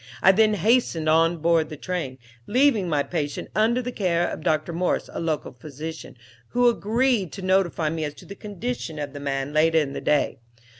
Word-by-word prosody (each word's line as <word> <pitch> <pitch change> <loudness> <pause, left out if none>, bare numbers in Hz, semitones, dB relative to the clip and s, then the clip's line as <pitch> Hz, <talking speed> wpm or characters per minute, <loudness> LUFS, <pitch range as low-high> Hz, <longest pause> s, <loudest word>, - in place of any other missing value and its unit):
I 190 - +8
then 215 +2 +3
hastened 205 -5 +2
on 165 +2 +4
board 165 -1 +2
the 155 - -7
train, 160 -6 -4 0.3
leaving 240 -6 +3
my 145 -3 +1
patient 145 -4 -4
under 230 +5 +2
the 250 - -3
care 175 -6 0
of - - -5
Dr. 155 0 0
Morse, 180 +2 -1
a - - -4
local 160 -3 -2
physician, 150 +4 -8 0.3
who 245 0 +2
agreed 230 - +1
to 195 - -7
notify 185 -4 +1
me 165 -1 -3
as 150 -1 -4
to - - -14
the 200 - -8
condition 205 -4 -5
of 145 -2 -5
the 145 - -7
man 140 0 -3
later 160 +1 +3
in 145 -3 +1
the - - -5
day. 150 -5 +1
170 Hz, 195 wpm, -24 LUFS, 155-205 Hz, 0.3 s, I